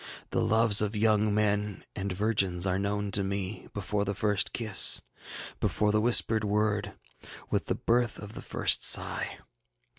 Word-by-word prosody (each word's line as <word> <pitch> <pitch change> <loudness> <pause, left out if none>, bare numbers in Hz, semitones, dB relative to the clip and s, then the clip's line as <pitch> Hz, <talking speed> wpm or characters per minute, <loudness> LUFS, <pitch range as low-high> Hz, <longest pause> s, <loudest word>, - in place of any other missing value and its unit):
The - - 0
loves 110 -2 +3
of 105 +1 -2
young 105 0 +1
men 105 -1 -1
and 95 0 -4
virgins 95 -2 -1
are 95 0 -1
known 100 0 -3
to 100 0 0
me, 100 +1 -4
before 105 0 -3
the 100 0 -4
first 105 -1 0
kiss, 110 -4 +4 0.6
before 105 -1 0
the 105 0 +1
whispered 115 -1 +3
word, 105 0 -1 0.6
with - - -1
the - - -1
birth 120 -2 0
of 105 +1 -9
the - - -9
first - - +1
sigh. - - +4
105 Hz, 155 wpm, -28 LUFS, 100-110 Hz, 0.6 s, kiss